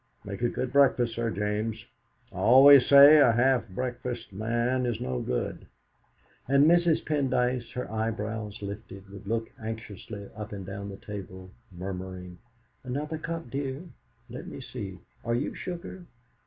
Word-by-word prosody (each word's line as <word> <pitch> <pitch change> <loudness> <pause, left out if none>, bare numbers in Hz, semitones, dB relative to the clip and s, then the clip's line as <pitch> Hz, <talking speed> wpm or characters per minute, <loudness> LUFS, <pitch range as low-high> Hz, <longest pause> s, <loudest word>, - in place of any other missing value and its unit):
Make 100 0 -6
a 120 - +2
good 130 +1 -4
breakfast, 130 -4 +4
Sir 115 0 -1
James; 105 +2 -2 0.5
I - - -11
always 135 +2 +8
say 140 +2 +9
a 125 -5 +6
half 125 0 +2
breakfasted 120 0 -5
man 120 +5 0
is 120 -3 -2
no 65 -1 -3
good!" 60 - -3 0.8
And 140 +2 +5
Mrs. 170 0 +3
Pendyce, 130 -4 0
her 125 - -4
eyebrows 110 -1 -3
lifted, 100 -1 -8
would 100 0 -11
look 115 +1 -2
anxiously 110 -2 -7
up 105 0 -7
and 100 -2 -6
down 100 +1 -6
the 95 - -8
table, 95 -3 -9 0.2
murmuring: 90 0 -7 0.4
"Another 150 +5 -4
cup, 165 -5 -5
dear; 135 +2 -3 0.4
let - - -8
me - - -8
see 95 -2 -7 0.3
are 115 0 0
you 130 +5 -2
sugar?" 180 0 -7
115 Hz, 145 wpm, -28 LUFS, 100-130 Hz, 0.8 s, say